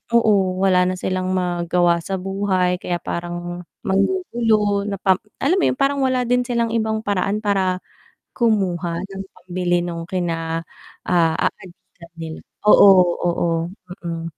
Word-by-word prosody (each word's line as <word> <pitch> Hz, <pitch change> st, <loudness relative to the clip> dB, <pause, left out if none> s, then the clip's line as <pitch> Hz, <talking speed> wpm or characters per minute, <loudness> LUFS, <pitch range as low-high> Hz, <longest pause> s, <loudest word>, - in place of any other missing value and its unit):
oo 200 Hz, -5 st, +3 dB
wala 180 Hz, -1 st, +4 dB
na 185 Hz, -, 0 dB
silang 185 Hz, 0 st, -2 dB
magawa 175 Hz, -1 st, +1 dB
sa 190 Hz, +3 st, -3 dB
buhay 190 Hz, -2 st, 0 dB
kaya 175 Hz, -1 st, -3 dB
parang 175 Hz, 0 st, -5 dB, 0.2 s
manggugulo 210 Hz, -, +1 dB
na 200 Hz, -, -2 dB
parang 190 Hz, -1 st, +3 dB, 0.2 s
alam 325 Hz, +8 st, +3 dB
mo -, -, +1 dB
yun -, -, 0 dB
parang 275 Hz, +1 st, +1 dB
wala 255 Hz, -1 st, +1 dB
din 245 Hz, +1 st, +1 dB
silang 235 Hz, -2 st, 0 dB
ibang 220 Hz, -1 st, 0 dB
paraan 205 Hz, +1 st, -1 dB
para 190 Hz, -3 st, +1 dB, 0.6 s
kumuha 180 Hz, -7 st, 0 dB
ng 195 Hz, 0 st, -7 dB
pambili 175 Hz, -1 st, -1 dB
nung 170 Hz, -1 st, -5 dB
kina 165 Hz, -3 st, -2 dB, 0.4 s
aadikan 170 Hz, 0 st, -2 dB
nila 165 Hz, -1 st, -7 dB, 0.3 s
oo, 210 Hz, -1 st, +8 dB, 0.4 s
oo, 170 Hz, 0 st, 0 dB, 0.6 s
mm, 165 Hz, -1 st, -4 dB
185 Hz, 135 wpm, -21 LUFS, 175-210 Hz, 0.6 s, oo